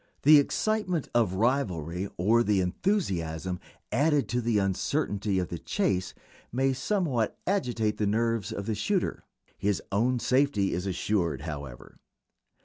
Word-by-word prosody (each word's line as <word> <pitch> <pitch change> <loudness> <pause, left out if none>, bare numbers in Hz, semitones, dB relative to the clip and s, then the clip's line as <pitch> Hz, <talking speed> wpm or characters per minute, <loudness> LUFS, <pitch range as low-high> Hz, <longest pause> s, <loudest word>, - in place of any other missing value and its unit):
The 150 +1 +9
excitement 185 +1 0
of 115 -6 +2
rivalry 95 - 0
or 110 +7 +4
the 105 -4 +2
enthusiasm, 90 - -1 0.3
added 145 +4 +2
to 125 +1 0
the 115 -2 +1
uncertainty, 100 +1 0
of 90 -2 -1
the 85 - -5
chase 95 +2 -1 0.4
may 135 +2 +1
somewhat 135 - 0
agitate 120 - 0
the 105 - 0
nerves 115 0 0
of 100 - -4
the 110 - -1
shooter. 185 - -1 0.4
His 100 -1 +1
own 120 +6 +2
safety 125 -4 +2
is 90 +3 -2
assured, 90 -6 -1
however. 70 -5 -8
110 Hz, 135 wpm, -28 LUFS, 95-135 Hz, 0.4 s, The